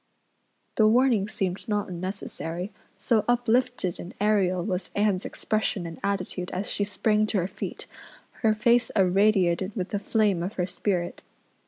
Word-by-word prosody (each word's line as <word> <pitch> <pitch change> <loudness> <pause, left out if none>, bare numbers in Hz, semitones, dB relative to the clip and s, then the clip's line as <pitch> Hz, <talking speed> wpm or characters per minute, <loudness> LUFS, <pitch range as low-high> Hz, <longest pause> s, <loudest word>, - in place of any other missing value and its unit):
The 215 - +6
warning 230 -3 +4
seemed 195 -1 -3
not 210 -1 0
unnecessary, 180 0 -4 0.2
so 225 -3 +1
uplifted 245 -5 +1
and 175 - -8
aerial 195 -4 +2
was 185 -3 -2
Anne's 205 -2 +1
expression 215 -4 -1
and 165 -1 -7
attitude 185 -2 -2
as 190 +3 -3
she 205 - 0
sprang 210 +1 +1
to 215 - 0
her 180 -1 +1
feet, - - -6 0.6
her 220 -2 +3
face 235 +3 +3
irradiated 190 -1 +3
with 185 -3 -3
the 205 - -1
flame 205 -4 +1
of 185 +5 -3
her 180 - -1
spirit. 180 -1 -2
200 Hz, 150 wpm, -26 LUFS, 180-215 Hz, 0.6 s, The